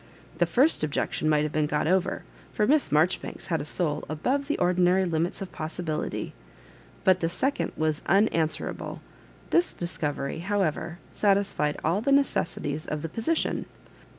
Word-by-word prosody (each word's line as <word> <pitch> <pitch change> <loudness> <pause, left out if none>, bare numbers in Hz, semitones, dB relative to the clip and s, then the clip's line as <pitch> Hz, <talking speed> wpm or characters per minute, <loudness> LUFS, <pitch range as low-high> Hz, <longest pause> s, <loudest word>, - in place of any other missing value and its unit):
The - - +4
first 270 - +3
objection 155 +1 0
might 150 -1 +3
have 150 - -2
been 150 -1 +1
got 150 0 0
over, 185 +3 +1 0.3
for 210 - +1
Miss 295 +5 +3
Marjoribanks 160 +7 0
had 160 - +1
a - - -5
soul 155 -2 -1
above 260 - -1
the 295 - 0
ordinary 180 +1 +3
limits 170 +2 -1
of 190 - -9
possibility, 155 0 -4 0.7
but 185 -1 +5
the 165 - 0
second 270 +11 -1
wias 155 -1 0
unan 200 +5 +5 0.2
swerable. - - -6 0.5
This 350 +1 +3
discovery, 150 -4 -2
however, 175 -2 -1
satisfied 195 -7 +1
all 170 +6 +1
the 275 - +1
necessities 165 - +1
of 150 -1 -3
the 165 - -3
position. 230 - -1
175 Hz, 150 wpm, -27 LUFS, 155-205 Hz, 0.7 s, but